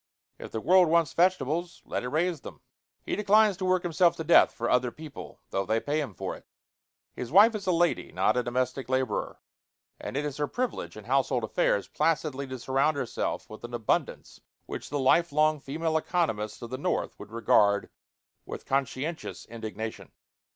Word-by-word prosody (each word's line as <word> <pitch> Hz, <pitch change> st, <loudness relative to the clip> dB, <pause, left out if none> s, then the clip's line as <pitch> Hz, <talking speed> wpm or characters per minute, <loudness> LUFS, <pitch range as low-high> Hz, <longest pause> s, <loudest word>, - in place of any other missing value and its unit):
If -, -, -8 dB
the 110 Hz, -, -3 dB
world 185 Hz, +3 st, +5 dB
wants 165 Hz, -2 st, +2 dB
vegetables, 175 Hz, -1 st, 0 dB
let -, -, -3 dB
it 125 Hz, -, -4 dB
raise 160 Hz, +2 st, 0 dB
them. -, -, -11 dB, 0.4 s
He -, -, -2 dB
declines 210 Hz, 0 st, +4 dB
to 185 Hz, -, -3 dB
work 185 Hz, -1 st, +2 dB
himself 170 Hz, 0 st, +3 dB
to 160 Hz, -, -5 dB
death 170 Hz, -, +6 dB
for 120 Hz, -, -3 dB
other 125 Hz, 0 st, +2 dB
people, 150 Hz, +2 st, -10 dB
though 95 Hz, -, 0 dB
they 110 Hz, +4 st, 0 dB
pay 150 Hz, +5 st, -1 dB
him 125 Hz, -10 st, -6 dB
for -, -, -4 dB
it. -, -, -16 dB, 0.7 s
His 125 Hz, -, -6 dB
wife 210 Hz, +6 st, +7 dB
is 200 Hz, -3 st, -5 dB
a -, -, +4 dB
lady, 175 Hz, 0 st, +1 dB
not 110 Hz, -, +2 dB
a 125 Hz, -, +2 dB
domestic 125 Hz, +2 st, -2 dB
laborer; 130 Hz, -4 st, -1 dB, 0.6 s
and -, -, -5 dB
it 150 Hz, -, -1 dB
is 145 Hz, -2 st, -4 dB
her 145 Hz, -1 st, 0 dB
privilege, 245 Hz, -, -3 dB
in 110 Hz, -, -9 dB
household 130 Hz, 0 st, +1 dB
affairs, 100 Hz, -2 st, +1 dB
placidly 150 Hz, -3 st, -1 dB
to 130 Hz, 0 st, -6 dB
surround 135 Hz, +4 st, +1 dB
herself 125 Hz, -, -3 dB
with 110 Hz, -, -11 dB
an 120 Hz, 0 st, -5 dB
abundance 115 Hz, -3 st, -2 dB, 0.2 s
which -, -, -7 dB
the 145 Hz, -, -2 dB
lifelong 155 Hz, +2 st, +3 dB
female 160 Hz, +4 st, -2 dB
economists 120 Hz, -, -1 dB
of 120 Hz, -, -8 dB
the 130 Hz, -, -4 dB
North -, -, -2 dB
would -, -, -10 dB
regard 105 Hz, -3 st, +3 dB, 0.6 s
with -, -, -8 dB
conscientious 135 Hz, +4 st, -3 dB
indignation. 110 Hz, -1 st, -7 dB
140 Hz, 180 wpm, -28 LUFS, 120-170 Hz, 0.7 s, wife